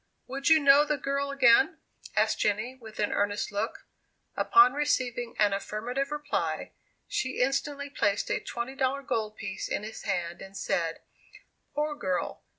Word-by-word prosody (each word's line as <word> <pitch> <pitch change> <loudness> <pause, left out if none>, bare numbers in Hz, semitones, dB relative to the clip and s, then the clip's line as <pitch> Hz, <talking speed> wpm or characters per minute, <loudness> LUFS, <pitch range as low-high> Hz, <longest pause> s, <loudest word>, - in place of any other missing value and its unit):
"Would 275 +4 -1
you 320 - +8
know 285 0 +7
the 300 0 0
girl 280 +1 -1
again?" 270 +4 +5 0.4
asked - - +2
Jenny, 215 +5 0
with 225 -4 -13
an 210 - 0
earnest 205 +1 0
look. 205 - -3 0.5
Upon 390 -10 +6
receiving 255 -5 -1
an 205 -2 +3
affirmative 230 +7 -3
reply, 295 -1 -2 0.4
she 260 0 -2
instantly 280 +2 0
placed 205 -6 0
a - - +1
$20 265 +3 -2
gold 220 -4 -2
piece 190 - -5
in - - -2
his 220 +1 -7
hand, 175 -4 -3
and 195 0 -9
said, 165 -3 -1 0.7
"Poor 300 +1 0
girl! 185 -10 -2
250 Hz, 150 wpm, -28 LUFS, 210-280 Hz, 0.7 s, you